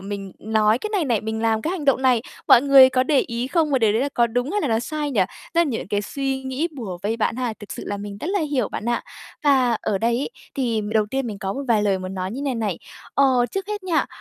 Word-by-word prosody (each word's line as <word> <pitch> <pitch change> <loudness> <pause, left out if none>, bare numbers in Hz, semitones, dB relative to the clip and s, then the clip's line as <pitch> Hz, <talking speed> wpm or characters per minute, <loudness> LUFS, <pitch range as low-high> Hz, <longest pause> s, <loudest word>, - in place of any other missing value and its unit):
mình 195 -1 -6
nói 220 +1 +2
cái 430 - -5
này 400 -6 +1
này, 235 -7 +1
mình 220 +1 -3
làm 220 -1 +1
cái 320 - -1
hành 360 -5 -4
động 275 -2 +3
này, 250 -4 +3 0.3
mọi 240 - +8
người 275 -2 +8
có 255 0 +2
để 280 +2 +2
ý 235 +1 -3
không? 315 +1 +1
Và 270 - +3
điều 220 -3 +3
đấy 225 - +1
là 280 - 0
có 235 - +4
đúng 245 +4 -2
hay 415 - +1
là 290 - -1
nó 225 -1 +2
sai 295 +4 -3
nhỉ?" 230 -7 +1 0.3
Tức - - +2
là 340 - +4
nh 255 -7 -3
cái 205 0 0
suy 270 +3 -3
nghĩ 265 +5 -2
bủa 195 -9 -5
vây 215 +3 -1
bạn 225 0 0
ha, 250 -3 -1
thực 210 - -9
sự - - -7
là 205 - -3
mình 200 0 -7
rất - - -4
là 400 -1 +1
hiểu 285 -8 0
bạn - - -5
ạ. 240 - 0 0.4
Và 265 -4 +4
ở 200 - -1
đây 235 +3 +1
ấy, 280 - -3 0.2
thì 235 -5 0
m 210 - -5
đầu 215 -1 +2
tiên 265 +4 -2
mình 210 -3 -5
có 195 -2 -3
một 275 - -4
vài 220 -3 +3
lời 200 -2 +1
nói 185 0 -4
như 235 - -6
thế - - -4
này 270 -3 -1
này, 210 -7 -2 0.4
ờ, 260 -3 +4
trước 390 0 -3
hết 420 -1 -4
nha, 345 -4 +1
245 Hz, 290 wpm, -22 LUFS, 215-275 Hz, 0.4 s, mọi